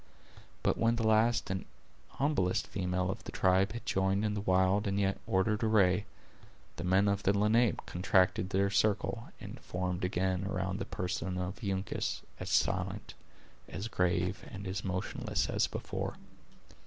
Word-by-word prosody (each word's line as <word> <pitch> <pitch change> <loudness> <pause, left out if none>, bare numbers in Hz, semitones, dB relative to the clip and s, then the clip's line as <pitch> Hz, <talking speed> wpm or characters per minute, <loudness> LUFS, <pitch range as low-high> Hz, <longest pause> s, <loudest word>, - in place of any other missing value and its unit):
But - - +1
when 115 +1 +3
the 115 -1 -1
last 110 0 +3
and 95 0 -2 0.5
humblest 135 -11 +1
female 90 -1 -1
of - - -7
the - - -7
tribe 95 +1 +2
had 120 -1 -7
joined 95 +2 +1
in 105 - 0
the 105 - -2
wild 95 +1 +2
and 100 0 0
yet 95 -1 +1
ordered 105 +3 +1
array, 105 -3 +3 0.7
the 85 - -4
men 95 +3 +3
of 100 0 +1
the 100 +1 +2
Lenape 110 +2 +2
contracted 90 0 +2
their 100 +1 +1
circle, 105 +3 +1
and - - -8
formed 90 0 -3
again 95 +1 0
around 95 0 -2
the - - -3
person 90 0 -3
of 90 +5 -4
Uncas, 95 -1 -2 0.2
as - - -5
silent, - - 0 0.6
as 100 +4 -4
grave, 90 -2 0
and 100 -3 -8
as 95 0 -3
motionless 95 -1 -2
as - - +2
before. - - -4
95 Hz, 155 wpm, -32 LUFS, 95-105 Hz, 0.7 s, when